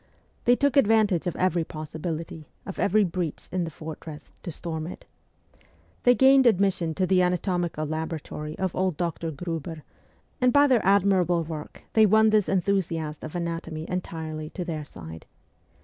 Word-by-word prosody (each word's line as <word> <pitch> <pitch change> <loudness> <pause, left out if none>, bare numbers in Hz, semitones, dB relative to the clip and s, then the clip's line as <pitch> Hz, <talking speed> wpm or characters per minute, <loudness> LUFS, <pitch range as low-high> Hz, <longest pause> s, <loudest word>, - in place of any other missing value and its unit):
They 245 - +6
took 285 +2 +1
advantage 215 - +3
of 175 - -2
every 180 -2 +1
possibility, 160 0 -6 0.2
of 195 - -7
every 210 +2 +3
breach 175 -3 -3
in 180 -1 0
the - - -4
fortress, 155 0 -9
to - - -6
storm 160 -1 -4
it. 180 - -9 1.0
They 245 0 +5
gained 265 0 +6
admission 185 -6 +2
to 190 - +1
the 185 0 +3
anatomical 180 -3 0
laboratory 155 -1 -5
of 190 -2 -2
old 185 -4 0
Dr. 170 -1 -2
Gruber, 160 0 -5 0.6
and 250 0 +5
by 285 +3 +6
their 255 -5 +3
admirable 185 -3 +3
work 155 -1 -8
they 220 -1 +6
won 220 +1 +5
this 210 -2 +3
enthusiast 170 -5 -1
of 155 +2 -7
anatomy 165 -2 -4
entirely 160 -4 -4
to 180 +1 -5
their 155 -3 -4
side. 80 - -10
175 Hz, 155 wpm, -26 LUFS, 160-195 Hz, 1.0 s, They